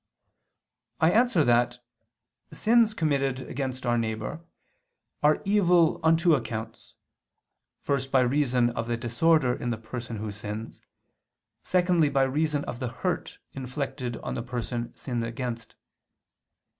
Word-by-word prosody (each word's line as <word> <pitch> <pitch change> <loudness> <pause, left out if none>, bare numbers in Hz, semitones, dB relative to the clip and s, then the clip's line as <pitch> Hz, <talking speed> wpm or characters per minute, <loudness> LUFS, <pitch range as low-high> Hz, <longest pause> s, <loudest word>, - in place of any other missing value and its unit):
I 160 +2 +4
answer 230 -6 +4
that, 120 0 +2 0.7
Sins 225 -1 +3
committed 140 -5 0
against 130 -1 -4
our 120 0 +2
neighbor 110 +7 -3 0.8
are 150 +1 +3
evil 180 -5 +4
on 160 0 +4
two 165 -5 +3
counts; 115 0 -7 0.9
first 135 -1 -1
by 130 - +5
reason 125 -2 +2
of 115 -1 -4
the 120 -1 -1
disorder 125 +3 +2
in 120 - -4
the 115 - -1
person 115 +1 -6
who 105 0 -4
sins, 105 +2 -7 0.8
secondly 180 -4 +2
by 135 -1 +2
reason 145 +2 0
of 120 - -6
the 130 - -2
hurt - - -3 0.2
inflicted 130 -1 -4
on - - -3
the - - -3
person 120 -1 -4
sinned 120 -3 -3
against. 115 0 -5
130 Hz, 130 wpm, -27 LUFS, 120-155 Hz, 0.9 s, by